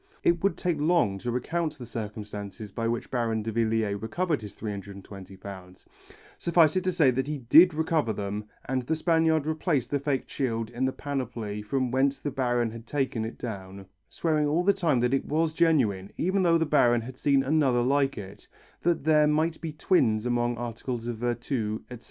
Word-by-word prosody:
It 170 0 +2
would 200 - +1
take 175 -4 -1
long 150 - +2
to 120 - -4
recount 155 +6 -2
the 125 - -8
circumstances 105 -2 -7
by 115 +3 -2
which 115 0 -3
Baron 115 -3 0
Davillier 110 -2 0
recovered 155 +7 -1
his 105 -2 -9
£320, 100 -2 -9 0.5
suffice 170 -1 +4
it 185 - +1
to 185 - +2
say 150 -7 +4
that 130 +2 -1
he 150 0 -2
did 155 +7 +6
recover 160 -6 +1
them 105 0 -4 0.2
and 130 0 -1
the 155 +6 -1
Spaniard 160 -2 +2
replaced 155 -5 -1
the 145 - +1
faked 140 -1 -1
shield 115 -4 -2
in 120 +2 -1
the 130 - +1
panoply 125 -7 -4
from 125 +4 -1
whence 135 +2 +1
the 145 - -3
Baron 120 -3 0
had 115 +1 -10
taken 130 -5 -1
it 110 - -6
down, 95 -4 -7 0.2
swearing 155 -3 0
all 160 +4 +1
the 200 +2 +4
time 165 -10 +1
that 125 +2 +1
it 135 - +1
was 155 +1 0
genuine 120 - +2
even 190 +3 +1
though 170 -2 +4
the 165 - +1
Baron 120 -6 +3
had 125 +3 -8
seen 140 0 +2
another 135 -4 +2
like 135 +1 +1
it, 100 -1 -9 0.3
that 170 -3 +1
there 150 0 +4
might 160 +2 +1
be 160 - -4
twins 125 - +2
among 120 -1 0
articles 120 0 -4
of 120 -1 -3
virtu, 120 -2 -2
etc. 125 - -7
125 Hz, 185 wpm, -27 LUFS, 110-155 Hz, 0.5 s, did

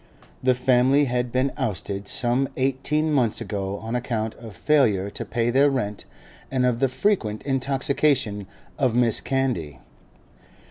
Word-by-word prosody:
The 130 0 +3
family 130 +3 +3
had 125 -1 -1
been 130 +2 +1
ousted 100 -5 -3
some 130 +1 0
eighteen 140 +4 0
months 125 -6 +2
ago 100 -1 -4
on 115 +1 -4
account 110 -3 -2
of 115 -3 -12
failure 110 -10 +2
to - - -5
pay 120 0 -1
their 140 +3 +4
rent 105 -7 -3 0.4
and 130 -1 +1
of 125 -2 +1
the 135 - +3
frequent 125 - 0
intoxication 135 -5 0 0.3
of 130 -5 +2
Mrs. 120 -2 +2
Candy. 120 - -2
125 Hz, 140 wpm, -24 LUFS, 110-135 Hz, 0.4 s, their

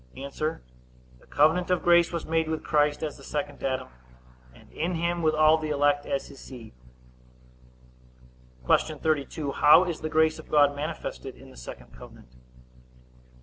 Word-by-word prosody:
A. 135 - -7
The 155 +2 -3 0.7
covenant 160 +5 +2
of 180 -1 +1
grace 175 -1 +4
was 170 -2 -4
made 160 0 0
with 160 -1 -3
Christ 150 0 +1
as 155 - -4
the - - -15
second 145 -1 -5
Adam, 130 -1 -2 0.6
and 60 - -19
in 170 +3 -2
him 170 +1 -1
with 155 -1 +2
all 155 +1 +5
the 155 -1 -4
elect 145 0 +1
as 135 - -2
his 140 - -13
seed. 120 - -11 1.9
Q. - - +2
32. 150 -1 -2
How 150 +5 +6
is 175 -3 -4
the 155 - -3
grace 160 0 +2
of - - -13
God 145 -1 +4
manifested 155 +3 -6
in - - -15
the - - -16
second 60 0 -11
covenant? 60 0 -15
155 Hz, 160 wpm, -26 LUFS, 145-160 Hz, 1.9 s, How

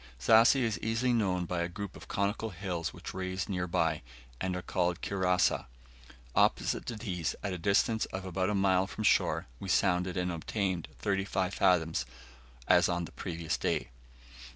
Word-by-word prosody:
Zassi 115 - +6
is 115 -3 0
easily 115 +3 +1
known 95 -6 +1
by 85 0 -2
a 85 - -1
group 100 +2 -6
of - - -11
conical 100 +3 -1
hills 85 -3 -3
which - - -8
rise 95 0 -3
near 90 -3 -2
by, 80 -2 +1 0.4
and 95 -1 -1
are 90 - -4
called 90 0 0
Kirassa. 90 -6 +1 0.7
Opposite - - +2
to 120 - -3
these, 95 -6 -3
at 100 - -1
the 90 - -4
distance 105 +4 +2
of 95 0 -6
about 95 +1 -1
a 105 - 0
mile 95 -1 +3
from 110 - -5
shore, - - +3
we - - -6
sounded, 90 +1 +2
and 90 0 0
obtained 90 0 -2
35 95 -1 -1
fathoms, 80 -7 +2 0.6
as - - +5
on 85 -1 -1
the - - -11
previous 85 -2 -3
day. - - -1
95 Hz, 170 wpm, -31 LUFS, 90-100 Hz, 0.7 s, Zassi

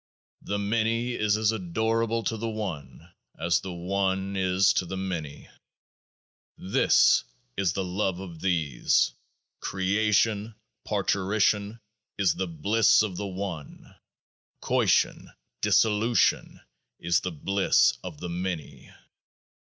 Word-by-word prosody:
4 - - -2
The - - +1
Many 115 +4 0
is 105 -2 +1
as 110 0 +2
adorable 110 +4 -1
to 115 - -1
the 115 +1 -3
One 85 - -6 0.2
as 85 +1 +1
the 95 - -7
One 95 +2 -2
is 95 +1 +3
to 90 - -1
the 95 - -5
Many. 85 -6 -5 1.1
This 95 - +3 0.3
is 95 -3 0
the 95 - -2
Love 95 0 -2
of 85 -4 -9
These; 80 -9 +1 0.5
creation 105 +2 0 0.3
parturition 105 +2 0 0.4
is 95 -5 +2
the 95 - -3
Bliss 105 +8 +3
of 100 -4 -3
the 100 +2 -4
One; 95 -6 -7 0.7
coition - - +1 0.3
dissolution 110 +2 +2 0.4
is 85 0 +1
the 90 - -3
Bliss 95 +5 +2
of 85 -5 -8
the 90 - -5
Many. 85 -4 -5
95 Hz, 115 wpm, -26 LUFS, 90-105 Hz, 1.1 s, is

